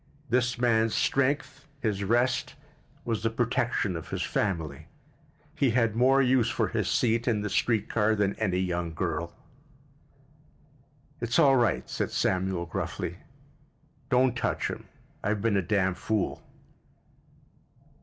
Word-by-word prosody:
This 125 0 +2
man's 115 -2 +2
strength, 140 +1 0
his 105 -6 -1
rest, 120 +4 +1 0.5
was 115 -3 -1
the 115 - +1
protection 120 -4 0
of 80 - -7
his - - -2
family. 80 -7 -2 0.7
He 135 - +2
had 115 -2 +1
more 135 +3 +4
use 125 -2 +3
for - - 0
his - - -1
seat 115 0 +1
in 110 -4 +1
the 105 - -3
street 115 -3 +1
car 110 -1 +2
than 100 -1 +1
any 95 -5 0
young 90 -3 -2
girl. 85 +2 -2 1.9
"It's 120 0 0
all 135 -1 +6
right," 120 -7 +1
said - - -2
Samuel 95 -1 0
gruffly. 85 - -4 0.9
"Don't 125 0 +3
touch 120 - -1
'him. - - -6 0.4
I've 105 -1 -1
been 115 -3 +2
a 100 - +3
damn 95 0 +1
fool." 105 +3 -2
110 Hz, 135 wpm, -28 LUFS, 95-125 Hz, 1.9 s, all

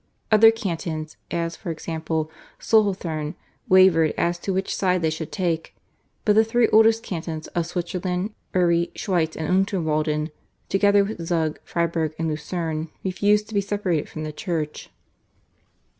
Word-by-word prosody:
Other 220 +1 +8
cantons, 165 -7 -3
as 170 0 -2
for 190 - -7
example, 160 -1 -3 0.3
Solothurn, 185 -8 +1 0.3
wavered 185 -4 +5
as 175 0 0
to 195 - -3
which 190 +1 -1
side 180 -2 +1
they 160 - +2
should 155 0 -5
take, 170 -4 -2 0.5
but 210 - +5
the 220 +1 +6
three 230 +1 +2
oldest 225 +1 +5
cantons 160 -3 -5
of 170 -1 -2
Switzerland, 180 +3 -3 0.2
Uri, 170 -1 +3
Schweiz 170 -5 0
and 160 - -3
Unterwalden, 160 -5 0 0.4
together 200 0 +4
with 195 -4 -5
Zug, 165 -2 -1
Freiburg 165 -2 -1
and 165 0 -1
Lucerne, 160 +1 -3
refused 205 +3 +2
to - - -9
be 200 - +2
separated 195 -6 -1
from 155 - -6
the 155 0 -5
Church. 155 -2 -4
170 Hz, 145 wpm, -24 LUFS, 160-195 Hz, 0.5 s, Other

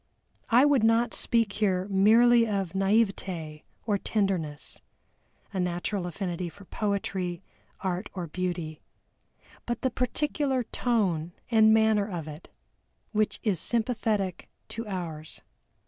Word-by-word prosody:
I 245 +4 +6
would 285 -6 +4
not 225 +1 +3
speak 230 -4 +1
here 190 -3 0
merely 230 +4 +5
of 195 -5 -1
naïveté 190 -6 0 0.2
or 205 -3 +1
tenderness 185 -10 -2 0.7
a 190 - -2
natural 180 +1 -1
affinity 175 -1 -3
for 200 +4 -15
poetry, 195 -4 -2 0.4
art, 185 +1 -2
or 180 -2 -3
beauty, 170 -2 -4 0.9
but 240 0 -3
the 260 - +1
peculiar 265 +1 0
tone 190 -9 0 0.2
and 220 -1 +6
manner 220 -2 +3
of 170 -5 -5
it, 150 +2 -10 0.6
which 215 -1 0
is 200 -7 +1
sympathetic 220 -5 0 0.2
to 230 0 -5
ours. 165 -6 -5
200 Hz, 115 wpm, -28 LUFS, 175-225 Hz, 0.9 s, I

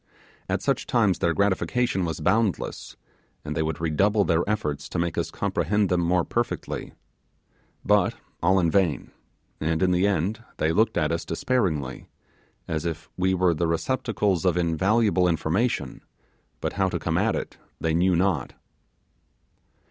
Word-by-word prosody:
At - - -1
such - - 0
times 105 -6 +2
their 85 - +2
gratification 100 +2 +1
was 80 0 -4
boundless, 110 +4 0 0.5
and 75 - -4
they 80 - 0
would 80 -1 -2
redouble 100 +6 +2
their 85 -1 +2
efforts 75 -9 -2
to - - -4
make 85 -2 -1
us - - -1
comprehend 105 +3 0
them 90 0 +2
more 85 0 +2
perfectly. 120 0 -3 0.9
But - - +3 0.3
all 95 +3 +4
in 85 -3 +2
vain; 90 -6 +1 0.5
and 80 +3 0
in 90 - +3
the 90 +2 +3
end 100 +4 -1
they 80 - +1
looked 110 +5 +2
at 75 -2 +1
us 85 0 -1
despairingly, 80 - -1 0.6
as 80 -2 -2
if 85 -1 -5
we 95 +1 +1
were 90 -1 +3
the 85 +1 0
receptacles 105 0 0
of 90 -2 +2
invaluable 95 +3 +2
information; 80 - -1 0.6
but - - -2
how 95 -1 +1
to 90 - -2
come 85 +1 -1
at 110 +3 +1
it - - -5 0.2
they 80 -1 0
knew 90 +2 +3
not. 85 -7 0
90 Hz, 155 wpm, -25 LUFS, 80-100 Hz, 0.9 s, all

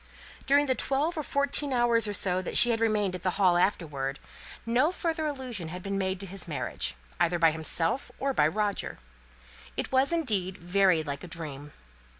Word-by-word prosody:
During 285 +1 +5
the 260 - +2
twelve 275 +6 0
or 310 - -1
fourteen 280 0 -1
hours 240 -2 +3
that 185 -3 0
she 240 - +6
had 225 - 0
remained 210 -4 +1
at 180 - -5
the 185 - +1
Hall 185 -3 +4
afterwards, 150 -7 0 0.5
no 245 +8 +3
further 325 -3 -2
allusion 255 - -4
had 180 +2 -7
been 200 0 -3
made 190 -1 -1
to - - -3
his 195 0 -7
marriage, 150 - -3 0.2
either 175 +1 +2
by 165 -1 +5
himself 165 - -1
or 275 0 0
by 150 - +4
Roger. 205 +4 -2 0.8
It - - -3
was, 265 +3 +3
indeed, 210 - 0
very 180 -1 +3
like 140 -2 -5
a - - -7
dream. 150 -4 -7
200 Hz, 175 wpm, -28 LUFS, 175-260 Hz, 0.8 s, she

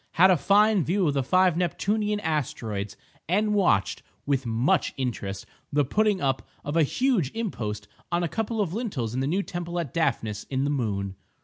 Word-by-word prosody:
Had 185 +3 +6
a - - +6
fine 205 +2 +4
view 185 +3 +1
of 145 - +1
the 140 - +1
five 185 +5 +3
Neptunian 210 +4 0
asteroids, 110 - -2 0.3
and 210 +4 +2
watched 175 - +2 0.2
with 135 -3 0
much 115 +4 +1
interest 105 -7 -3 0.3
the 145 0 +2
putting 210 +6 +2
up 135 -4 0 0.2
of 145 - -3
a 165 - +5
huge 215 - +1
impost 105 - -3 0.2
on 175 0 +1
a - - +1
couple 225 +4 -2
of 180 -4 -1
lintels 175 - -3
in 130 - -1
the 135 - 0
new 190 +7 +1
temple 175 -1 -4
at 155 -7 -4
Daphnis 120 -10 -1
in 135 0 -1
the 145 - 0
moon. 100 -8 -2
160 Hz, 185 wpm, -26 LUFS, 125-200 Hz, 0.3 s, Had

